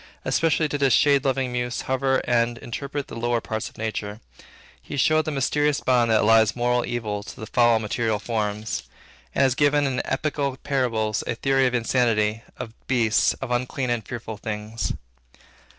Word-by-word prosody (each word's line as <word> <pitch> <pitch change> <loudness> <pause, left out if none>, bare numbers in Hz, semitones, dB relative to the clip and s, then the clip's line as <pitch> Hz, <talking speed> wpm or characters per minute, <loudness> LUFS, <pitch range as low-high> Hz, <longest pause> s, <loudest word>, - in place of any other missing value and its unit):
Especially 160 -1 +2
did 145 -1 -3
his 135 -3 +4
shade 140 +4 +4
loving 135 -2 0
muse 120 0 -2
hover 130 0 0
over 130 - +2
and 120 -1 +2
interpret 140 +4 -5
the - - -9
lower 120 0 0
parts 110 -1 -4
of - - -22
nature; 110 -1 -4 0.6
he 145 - -7
showed 155 +3 +3
the 155 - -2
mysterious 145 +1 +1
bond 120 -2 +2
that 110 -1 +4
allies 110 -1 +4
moral 125 0 +1
evil 110 -4 -3
to 100 - -11
the 110 - -5
foul 120 +1 +3
material 110 0 -1
forms, 105 -1 -2 0.5
and - - +3
has 130 -2 +3
given 145 +1 +3
in 130 -2 0
epical 140 -1 -2
parables 115 -6 0
a - - -1
theory 135 +1 +2
of 125 - -1
insanity, 115 -3 +1 0.2
of 110 - -7
beasts, 120 -3 +3
of 135 -2 -6
unclean 125 +1 -1
and 115 -4 -2
fearful 110 -3 -6
things. 105 +2 -4
120 Hz, 175 wpm, -24 LUFS, 110-135 Hz, 0.6 s, his